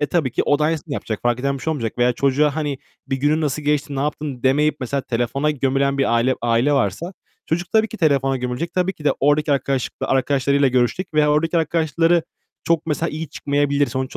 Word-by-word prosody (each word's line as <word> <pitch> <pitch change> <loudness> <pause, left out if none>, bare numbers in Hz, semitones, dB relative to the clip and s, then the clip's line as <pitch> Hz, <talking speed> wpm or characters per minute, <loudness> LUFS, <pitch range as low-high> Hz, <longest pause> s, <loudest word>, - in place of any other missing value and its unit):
e, 145 - +1
tabii 150 -5 0
ki - - +1
o 145 - +2
da 150 - +1
aynısını 155 -2 -2
yapacak, 110 -5 -4
fark 120 0 +1
eden 140 +1 0
bir - - -12
şey 160 - -1
olmayacak. 125 -7 -3
Veya 120 0 +3
çocuğa, 140 +4 +1
hani, 145 -3 -2 0.3
bir 135 - -1
günün 145 +4 +1
nasıl 150 -1 -1
geçti, 145 -1 0
ne - - -1
yaptın 145 -3 -3
demeyip 150 +4 +2
mesela 135 +2 -2
telefona 125 +4 -1
gömülen 140 -1 0
bir 135 - +2
aile 120 +3 +2
aile 120 +4 +2
varsa 135 - -1 0.3
çocuk 175 +2 -2
tabii 220 0 +3
ki 225 - -8
telefona 135 -6 +2
gömülecek. 125 +7 -4
Tabii 185 +1 +1
ki 150 - -15
de 150 - +4
oradaki 145 +1 +2
arkadaşlık 135 -1 -1
arkadaşlarıyla 140 +1 +2
görüşecek 130 +8 0
veya 150 -1 +4
oradaki 165 +3 +1
arkadaşları 165 +1 +1 0.4
çok 165 -1 +1
mesela 160 +2 -1
iyi 155 +1 -5
çıkmayabilir. 145 0 0
Sonuç 130 -1 -4
145 Hz, 210 wpm, -21 LUFS, 130-155 Hz, 0.4 s, de